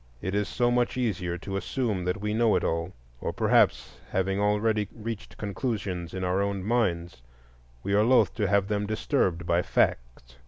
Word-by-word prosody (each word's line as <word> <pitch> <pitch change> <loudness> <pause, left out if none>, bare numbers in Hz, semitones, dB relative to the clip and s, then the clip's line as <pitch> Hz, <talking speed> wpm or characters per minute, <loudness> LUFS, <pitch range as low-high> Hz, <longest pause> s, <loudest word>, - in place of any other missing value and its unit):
It 95 +7 -4
is 105 0 0
so 120 -1 +1
much 120 0 +1
easier 90 -8 -1
to 95 +2 -4
assume 105 -4 -2
that 90 +3 -1
we 105 +1 -2
know 115 0 +3
it - - +1
all. 85 +2 -1 0.3
Or - - -2
perhaps, - - +2
having 95 +1 0
already 105 0 +1
reached 115 0 -7
conclusions 100 -5 -3
in 95 - -3
our 90 +2 +1
own 100 -1 -2
minds, 90 - -1 0.6
we 100 - -1
are 105 - +5
loth 125 +3 +4
to 105 -3 +1
have 100 0 +2
them 105 0 -1
disturbed 100 - 0
by 85 +1 +2
facts. - - -1
100 Hz, 175 wpm, -27 LUFS, 90-110 Hz, 0.6 s, are